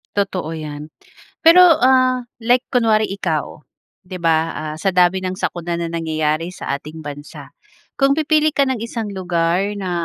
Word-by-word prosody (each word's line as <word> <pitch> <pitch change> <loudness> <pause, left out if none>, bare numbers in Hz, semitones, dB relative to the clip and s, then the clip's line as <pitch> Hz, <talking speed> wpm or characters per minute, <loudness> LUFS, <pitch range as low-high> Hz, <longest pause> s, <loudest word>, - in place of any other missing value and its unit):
Totoo 185 -5 -2
yan. 150 -1 -7 0.5
Pero 350 +2 +7 0.2
ah, 255 0 +3 0.2
like 245 +1 +2
kunwari 220 -4 +2
ikaw 160 -6 -4 0.4
'di 180 0 -8
ba? 165 -1 +1
Ah, 155 0 -6
sa 190 +5 -1
dami 180 +1 +2
ng 185 - -2
sakuna 175 -2 -4
na 170 - -2
nangyayari 160 0 -2
sa 140 - -4
ating 150 +3 -11
bansa. 145 0 -9 0.5
Kung 275 0 +3
pipili 310 0 +2
ka 280 -2 +1
ng 260 - 0
isang 230 -2 -5
lugar 180 0 -1
na, 190 -2 -4
180 Hz, 155 wpm, -19 LUFS, 160-230 Hz, 0.5 s, Pero